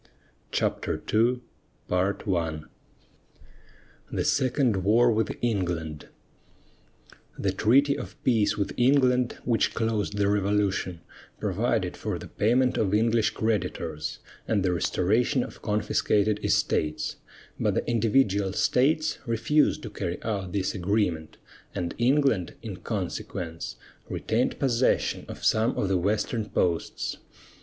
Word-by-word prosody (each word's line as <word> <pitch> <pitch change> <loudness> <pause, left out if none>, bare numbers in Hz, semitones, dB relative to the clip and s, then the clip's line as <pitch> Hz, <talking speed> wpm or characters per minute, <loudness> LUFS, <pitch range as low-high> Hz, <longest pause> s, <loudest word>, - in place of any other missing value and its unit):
CHAPTER - - -1
II 120 +3 +3 0.5
THE 90 -4 -1 1.6
SECOND 130 -5 +2
WAR 120 +4 +5
WITH 110 0 0
ENGLAND 85 -9 -2 1.3
The - - 0
treaty 140 +6 +3
of - - -9
peace 115 -5 +2
with 100 - -1
England 125 -1 +3
which 115 -2 +1
closed 110 -2 -1
the 100 -1 +2
Revolution 100 -3 0 0.4
provided - - 0
for - - -3
the - - -9
payment 125 +4 +2
of 100 -1 +2
English 115 0 +3
creditors 85 -8 -2 0.3
and 105 -4 +1
the 90 -2 +1
restoration 110 - +1
of - - -10
confiscated 105 0 +1
estates, 75 0 0 0.4
but - - +1
the - - -1
individual 105 -4 +2
states 155 - +2
refused 115 +7 +2
to 110 - -6
carry 90 -4 -3
out 100 -5 -3
this 95 0 -1
agreement, 90 -4 -1 0.4
and 85 -1 -2
England, 125 - +2
in - - -6
consequence, 80 -2 -4 0.3
retained 120 +3 0
possession 130 -2 +1
of - - -7
some 110 +2 +2
of 95 - 0
the 95 - +2
Western 105 +3 -1
posts. 85 -3 -1
105 Hz, 115 wpm, -27 LUFS, 95-120 Hz, 1.6 s, WAR